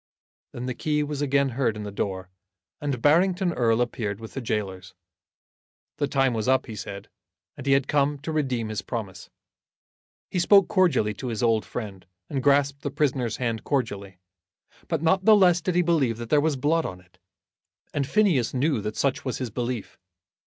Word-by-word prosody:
Then 120 Hz, -, -6 dB
the 125 Hz, -, -2 dB
key 150 Hz, +4 st, 0 dB
was 145 Hz, -1 st, -4 dB
again 140 Hz, -1 st, +2 dB
heard 120 Hz, -3 st, -1 dB
in 105 Hz, -, -5 dB
the 105 Hz, -, -6 dB
door, 95 Hz, -2 st, -4 dB, 0.5 s
and 140 Hz, -5 st, -3 dB
Barrington 180 Hz, +4 st, +3 dB
Erle 115 Hz, -3 st, +2 dB
appeared 105 Hz, -4 st, -4 dB
with 110 Hz, -1 st, -10 dB
the 135 Hz, -, -4 dB
gaolers. 100 Hz, -5 st, -4 dB, 1.0 s
The 145 Hz, -, 0 dB
time 135 Hz, -2 st, +2 dB
was 110 Hz, 0 st, -2 dB
up, 130 Hz, 0 st, +3 dB
he 110 Hz, -, -8 dB
said, 100 Hz, 0 st, -7 dB, 0.5 s
and 140 Hz, -1 st, -9 dB
he 135 Hz, -, +5 dB
had 135 Hz, 0 st, +2 dB
come 145 Hz, 0 st, +1 dB
to 160 Hz, -, -4 dB
redeem 130 Hz, -7 st, -1 dB
his 105 Hz, -3 st, -3 dB
promise. 95 Hz, -3 st, -6 dB, 1.0 s
He 180 Hz, -, 0 dB
spoke 195 Hz, +2 st, +6 dB
cordially 155 Hz, -, +2 dB
to 125 Hz, +5 st, -7 dB
his 115 Hz, -1 st, -3 dB
old 115 Hz, -2 st, +2 dB
friend, 100 Hz, -6 st, -7 dB, 0.2 s
and 135 Hz, -, -1 dB
grasped 140 Hz, 0 st, +2 dB
the 145 Hz, -, -2 dB
prisoner's 130 Hz, -5 st, -1 dB
hand 115 Hz, -3 st, -2 dB
cordially, 100 Hz, -9 st, -2 dB, 0.7 s
but 165 Hz, -2 st, -2 dB
not 190 Hz, +4 st, +2 dB
the 220 Hz, -, +8 dB
less 180 Hz, -4 st, +4 dB
did 175 Hz, +1 st, -1 dB
he 180 Hz, -, +4 dB
believe 145 Hz, -9 st, +1 dB
that 120 Hz, -1 st, -8 dB
there 150 Hz, -, +5 dB
was 155 Hz, -1 st, +1 dB
blood 155 Hz, +5 st, +1 dB
on 90 Hz, -9 st, -6 dB
it, 90 Hz, 0 st, -25 dB, 0.7 s
and 140 Hz, -2 st, -1 dB
Phineas 170 Hz, -, +2 dB
knew 135 Hz, -2 st, +1 dB
that 105 Hz, +1 st, -5 dB
such 140 Hz, -2 st, 0 dB
was 130 Hz, -, -3 dB
his 125 Hz, -4 st, -4 dB
belief. 120 Hz, -1 st, -4 dB
130 Hz, 190 wpm, -25 LUFS, 110-150 Hz, 1.0 s, the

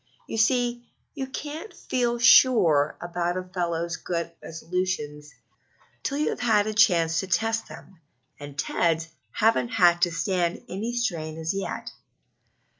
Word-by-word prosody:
You 225 Hz, -, -4 dB
see, 240 Hz, +1 st, +2 dB, 0.3 s
you 270 Hz, -3 st, -4 dB
can't 305 Hz, +9 st, -6 dB
feel 240 Hz, -2 st, -1 dB
sure 190 Hz, -, +5 dB
about 175 Hz, 0 st, -2 dB
a 185 Hz, -, -3 dB
fellow's 170 Hz, -2 st, -3 dB
good 170 Hz, 0 st, -3 dB
resolutions 165 Hz, -3 st, -4 dB, 0.7 s
till 280 Hz, -, -2 dB
you 300 Hz, -, +1 dB
have -, -, -5 dB
had 220 Hz, -4 st, +3 dB
a 215 Hz, -, -2 dB
chance 170 Hz, -7 st, +3 dB
to 190 Hz, -, -3 dB
test 225 Hz, +4 st, 0 dB
them, 190 Hz, -, -13 dB, 0.4 s
and 145 Hz, -1 st, -10 dB
Ted's 165 Hz, +3 st, 0 dB, 0.2 s
haven't 225 Hz, +2 st, +2 dB
had 175 Hz, -7 st, +4 dB
to 175 Hz, -, +3 dB
stand 175 Hz, 0 st, -1 dB
any 220 Hz, +6 st, -4 dB
strain 160 Hz, -10 st, -2 dB
as 160 Hz, +2 st, -2 dB
yet." 195 Hz, 0 st, -4 dB
185 Hz, 140 wpm, -25 LUFS, 165-230 Hz, 0.7 s, sure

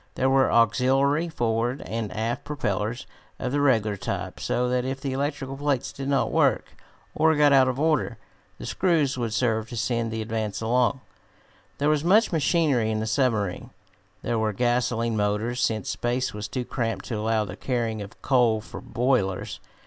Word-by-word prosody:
There 130 Hz, +1 st, +1 dB
were 135 Hz, 0 st, +4 dB
auxiliary 135 Hz, +7 st, +3 dB
forward 120 Hz, -2 st, -1 dB
and 110 Hz, -2 st, -4 dB
aft 115 Hz, +2 st, -2 dB
propellers 115 Hz, -5 st, -2 dB, 0.3 s
of 125 Hz, -, -3 dB
the 145 Hz, +1 st, +1 dB
regular 110 Hz, -7 st, +2 dB
type, -, -, -4 dB
so 125 Hz, 0 st, 0 dB
that 125 Hz, 0 st, 0 dB
if 130 Hz, +1 st, -3 dB
the 135 Hz, -1 st, -3 dB
electrical 135 Hz, -1 st, -3 dB
plates 140 Hz, -2 st, -1 dB
did 135 Hz, 0 st, -5 dB
not 140 Hz, -2 st, +1 dB
work, -, -, +1 dB, 0.4 s
or 160 Hz, 0 st, +3 dB
got 145 Hz, -1 st, +5 dB
out 130 Hz, -1 st, +6 dB
of 130 Hz, +1 st, -1 dB
order, 150 Hz, -6 st, +1 dB, 0.4 s
the -, -, -8 dB
screws 165 Hz, -7 st, +1 dB
would 120 Hz, -3 st, -2 dB
serve 110 Hz, -1 st, 0 dB
to 120 Hz, -, -6 dB
send 115 Hz, 0 st, -1 dB
the 110 Hz, 0 st, -3 dB
Advance 110 Hz, -2 st, -3 dB
along. 125 Hz, +3 st, +1 dB, 0.8 s
There 145 Hz, -, 0 dB
was 150 Hz, -1 st, +2 dB
much 205 Hz, +6 st, +4 dB
machinery 150 Hz, -7 st, +2 dB
in 110 Hz, 0 st, -1 dB
the 110 Hz, -, -2 dB
submarine. 110 Hz, -5 st, 0 dB, 0.5 s
There 115 Hz, -, 0 dB
were 110 Hz, -1 st, 0 dB
gasolene 120 Hz, 0 st, 0 dB
motors, 105 Hz, +4 st, 0 dB
since 110 Hz, -4 st, 0 dB
space 125 Hz, +2 st, -1 dB
was 105 Hz, 0 st, -5 dB
too 125 Hz, -2 st, -4 dB
cramped 115 Hz, -3 st, -3 dB
to 115 Hz, -, -2 dB
allow 110 Hz, 0 st, 0 dB
the -, -, -7 dB
carrying 115 Hz, -4 st, -2 dB
of 100 Hz, -, -10 dB
coal 120 Hz, -5 st, +3 dB
for 110 Hz, -, -9 dB
boilers. 120 Hz, -7 st, -1 dB
120 Hz, 175 wpm, -25 LUFS, 110-135 Hz, 0.8 s, out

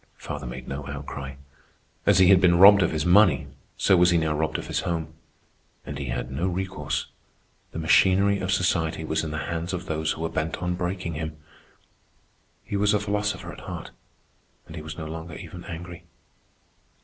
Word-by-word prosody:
Father 75 Hz, -3 st, -6 dB
made 65 Hz, +1 st, -7 dB
no 70 Hz, +1 st, -5 dB
outcry. 70 Hz, -1 st, -6 dB, 0.7 s
As 100 Hz, -, +6 dB
he 95 Hz, -1 st, +6 dB
had 95 Hz, -2 st, +7 dB
been 85 Hz, -2 st, +5 dB
robbed 100 Hz, +2 st, +9 dB
of 85 Hz, -, +3 dB
his 80 Hz, -1 st, -2 dB
money, 90 Hz, -4 st, +5 dB, 0.3 s
so 95 Hz, -, +4 dB
was 90 Hz, 0 st, +5 dB
he 85 Hz, -, +3 dB
now 80 Hz, -2 st, +1 dB
robbed 80 Hz, +1 st, -1 dB
of -, -, -6 dB
his -, -, -2 dB
home. 80 Hz, -2 st, -3 dB, 0.7 s
And 70 Hz, -1 st, -6 dB
he 70 Hz, -, -4 dB
had -, -, -3 dB
no 70 Hz, +8 st, -1 dB
recourse. 90 Hz, -6 st, -2 dB, 0.7 s
The -, -, -7 dB
machinery 95 Hz, +5 st, +4 dB
of 95 Hz, 0 st, -2 dB
society 80 Hz, -4 st, +1 dB
was 80 Hz, +1 st, -1 dB
in 80 Hz, -, -3 dB
the 75 Hz, -, -4 dB
hands 85 Hz, +2 st, -3 dB
of 90 Hz, -, -4 dB
those 80 Hz, 0 st, -1 dB
who -, -, -8 dB
were 80 Hz, -, -1 dB
bent 80 Hz, +1 st, -2 dB
on 90 Hz, 0 st, -2 dB
breaking 90 Hz, -1 st, -3 dB
him. 80 Hz, 0 st, -5 dB, 1.3 s
He -, -, -5 dB
was 105 Hz, +1 st, +3 dB
a -, -, +2 dB
philosopher 100 Hz, -4 st, -2 dB
at -, -, -11 dB
heart, -, -, -7 dB, 0.7 s
and 80 Hz, -, -11 dB
he 80 Hz, -, -6 dB
was 80 Hz, 0 st, -8 dB
no 80 Hz, -, -5 dB
longer 80 Hz, 0 st, -7 dB
even 90 Hz, +2 st, -9 dB
angry. 85 Hz, 0 st, -8 dB
85 Hz, 190 wpm, -25 LUFS, 80-95 Hz, 1.3 s, robbed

